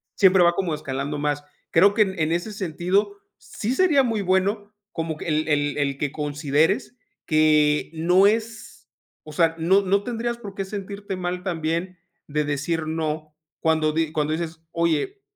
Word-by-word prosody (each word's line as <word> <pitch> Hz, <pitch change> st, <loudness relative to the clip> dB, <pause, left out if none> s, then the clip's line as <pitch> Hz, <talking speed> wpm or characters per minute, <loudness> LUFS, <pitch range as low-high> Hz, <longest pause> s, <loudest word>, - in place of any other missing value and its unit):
siempre 190 Hz, -2 st, +5 dB
va 175 Hz, 0 st, +4 dB
como 170 Hz, -4 st, -1 dB
escalando 140 Hz, +1 st, -4 dB
más. 145 Hz, 0 st, -1 dB, 0.3 s
Creo 195 Hz, +5 st, +5 dB
que 220 Hz, -, +3 dB
en 190 Hz, -2 st, -5 dB
en 160 Hz, 0 st, +1 dB
ese 175 Hz, +6 st, -2 dB
sentido 195 Hz, +2 st, -1 dB, 0.2 s
sí 225 Hz, +5 st, -4 dB
sería 300 Hz, -5 st, +4 dB
muy 225 Hz, -4 st, -1 dB
bueno 200 Hz, +3 st, 0 dB, 0.2 s
como 165 Hz, -1 st, -3 dB
que -, -, -7 dB
el 155 Hz, 0 st, 0 dB
el 145 Hz, -1 st, +1 dB
el 140 Hz, -2 st, -1 dB
que 145 Hz, -2 st, -1 dB
consideres 150 Hz, -, 0 dB, 0.3 s
que 155 Hz, -1 st, +3 dB
no 180 Hz, +4 st, +4 dB
es 220 Hz, +1 st, -2 dB, 0.5 s
o 155 Hz, -, -9 dB
sea, 165 Hz, +1 st, +3 dB
no 190 Hz, +5 st, +4 dB
no 200 Hz, +1 st, +1 dB
tendrías 235 Hz, 0 st, -3 dB
por 200 Hz, -4 st, -9 dB
qué 195 Hz, -, -3 dB
sentirte 200 Hz, 0 st, -6 dB
mal 180 Hz, 0 st, -3 dB
también 170 Hz, +1 st, -2 dB, 0.3 s
de 150 Hz, 0 st, -1 dB
decir 155 Hz, +3 st, -2 dB
no, 155 Hz, -1 st, -3 dB, 0.3 s
cuando 160 Hz, -1 st, +2 dB
di 160 Hz, -1 st, 0 dB
cuando 155 Hz, -1 st, 0 dB
dices: 160 Hz, 0 st, -4 dB
"Oye, 170 Hz, -, -1 dB
170 Hz, 170 wpm, -23 LUFS, 155-200 Hz, 0.5 s, siempre